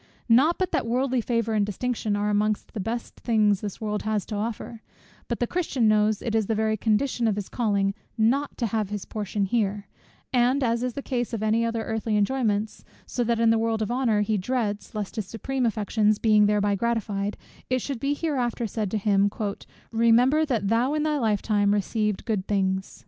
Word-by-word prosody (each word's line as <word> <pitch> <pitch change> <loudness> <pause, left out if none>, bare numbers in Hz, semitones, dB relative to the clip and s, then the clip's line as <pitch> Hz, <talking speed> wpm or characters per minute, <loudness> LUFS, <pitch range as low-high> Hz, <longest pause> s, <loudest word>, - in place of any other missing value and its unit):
Not 270 +9 +4
but 370 -1 -1
that - - 0
worldly 255 +1 +1
favour 230 -1 -1
and 210 -1 +2
distinction 215 +1 -2
are 205 +1 0
amongst 210 0 0
the 220 - -4
best 230 +4 -4
things 210 -4 +2
this 205 -2 -5
world 210 -1 -2
has 215 -2 -1
to 215 - -5
offer: 225 +1 -4 0.5
but 235 - -3
the 240 - +2
Christian 275 -6 0
knows 215 0 +2
it 230 - -2
is 220 -3 +1
the 225 - 0
very 220 0 +1
condition 230 +3 +1
of 215 - +1
his 205 -2 -5
calling, 200 -4 0 0.2
not 255 +6 +1
to 240 - 0
have 215 -2 -1
his 205 -2 -4
portion 205 -1 -2
here; 205 -1 -1 0.5
and 255 +3 +3
as 230 -1 +1
in 250 - 0
the 280 - -5
case 245 -2 -2
of 220 -2 -2
any 220 +2 +2
other 230 -1 -1
earthly 220 -1 -1
enjoyments, 215 -1 0 0.2
so 245 - -3
in 235 - 0
that 235 -1 +1
also 230 -1 +4
of 225 - +2
worldly 225 -2 0
honour, 240 -4 +2
he 210 0 0
dreads, 210 -1 -2
lest 210 +2 -4
his 210 -4 -3
supreme 250 +4 -2
affections 215 -1 +1
being 210 -2 +4
thereby 205 -1 +2
gratified, 205 -2 -1 0.3
it 255 - +2
should 270 0 -4
be 280 +3 0
hereafter 255 -7 -1
said 215 -1 -2
to 215 - -1
him 200 -1 +2 0.6
"remember 240 +7 +4
that 225 -7 0
thou 245 +6 +2
in 305 - 0
thy 305 -1 0
life 215 -5 +1
time 205 -2 +2
receivedst 210 0 0
thy - - -14
good 210 -4 -1
things." 190 -2 -1
220 Hz, 205 wpm, -25 LUFS, 210-240 Hz, 0.6 s, Not